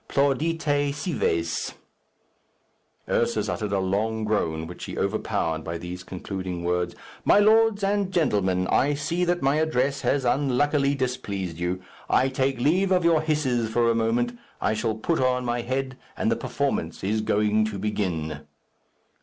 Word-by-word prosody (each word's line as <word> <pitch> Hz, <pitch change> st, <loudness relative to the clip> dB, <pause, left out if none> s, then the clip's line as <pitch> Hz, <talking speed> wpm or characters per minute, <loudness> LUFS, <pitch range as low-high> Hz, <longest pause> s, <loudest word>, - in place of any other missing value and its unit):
Plaudite, 145 Hz, +1 st, +1 dB
cives." 85 Hz, -, -1 dB, 1.3 s
Ursus 110 Hz, -3 st, +1 dB
uttered 105 Hz, 0 st, -2 dB
a 100 Hz, -, +1 dB
long 105 Hz, +4 st, 0 dB
groan, 80 Hz, -7 st, 0 dB
which 90 Hz, +2 st, -8 dB
he -, -, -7 dB
overpowered 80 Hz, -1 st, -1 dB
by 85 Hz, +1 st, -4 dB
these 90 Hz, +2 st, -7 dB
concluding 95 Hz, -1 st, -5 dB
words, 90 Hz, 0 st, -1 dB, 0.3 s
"My -, -, +5 dB
lords 215 Hz, 0 st, +4 dB
and 200 Hz, -1 st, +1 dB
gentlemen, 100 Hz, -, +1 dB
I 145 Hz, +2 st, +3 dB
see 165 Hz, +5 st, -1 dB
that 175 Hz, -2 st, 0 dB
my 135 Hz, +2 st, +3 dB
address 140 Hz, -3 st, +1 dB
has 135 Hz, -2 st, +1 dB
unluckily 140 Hz, +2 st, +2 dB
displeased 100 Hz, -10 st, -3 dB
you. 90 Hz, +1 st, -2 dB, 0.3 s
I 130 Hz, -, +3 dB
take 130 Hz, -1 st, 0 dB
leave 180 Hz, +9 st, +2 dB
of 180 Hz, -2 st, +3 dB
your 165 Hz, -2 st, +4 dB
hisses 135 Hz, -7 st, 0 dB
for 115 Hz, +1 st, +2 dB
a -, -, 0 dB
moment. 120 Hz, +2 st, +1 dB, 0.2 s
I 110 Hz, -, +1 dB
shall 110 Hz, 0 st, -1 dB
put 160 Hz, +9 st, -1 dB
on 125 Hz, -1 st, +1 dB
my 120 Hz, 0 st, 0 dB
head, 130 Hz, +2 st, -3 dB, 0.2 s
and -, -, +1 dB
the -, -, +3 dB
performance -, -, -2 dB
is 110 Hz, +3 st, 0 dB
going 105 Hz, 0 st, +2 dB
to 110 Hz, -2 st, -4 dB
begin." 80 Hz, -7 st, -3 dB
120 Hz, 155 wpm, -25 LUFS, 95-145 Hz, 1.3 s, My